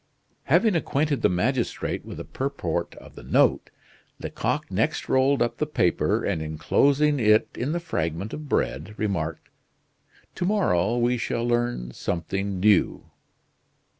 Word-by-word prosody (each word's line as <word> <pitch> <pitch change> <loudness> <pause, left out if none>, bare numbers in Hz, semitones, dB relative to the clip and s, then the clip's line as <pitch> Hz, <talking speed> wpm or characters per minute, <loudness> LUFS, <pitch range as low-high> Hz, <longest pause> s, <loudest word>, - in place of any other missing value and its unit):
Having 220 -5 +3
acquainted 145 -4 0
the - - +4
magistrate 120 +7 -1
with - - -9
the - - -6
purport 85 - -3
of - - -14
the - - -11
note, - - +2 0.5
Lecoq - - -3
next - - 0
rolled 135 0 +3
up 120 0 -3
the 150 - 0
paper, 90 - +1
and 80 - -1
enclosing 140 - +2
it 110 -1 +4
in 130 +5 -2
the 170 - -1
fragment 85 - -3
of 150 -1 -7
bread, 85 - -1
remarked: 85 -7 -2 0.9
"To 175 - -3
morrow 120 - +2
we 120 +1 +2
shall 115 +1 -2
learn 120 - -1
something 95 +7 -3
new." 105 -1 +2
115 Hz, 135 wpm, -25 LUFS, 90-140 Hz, 0.9 s, the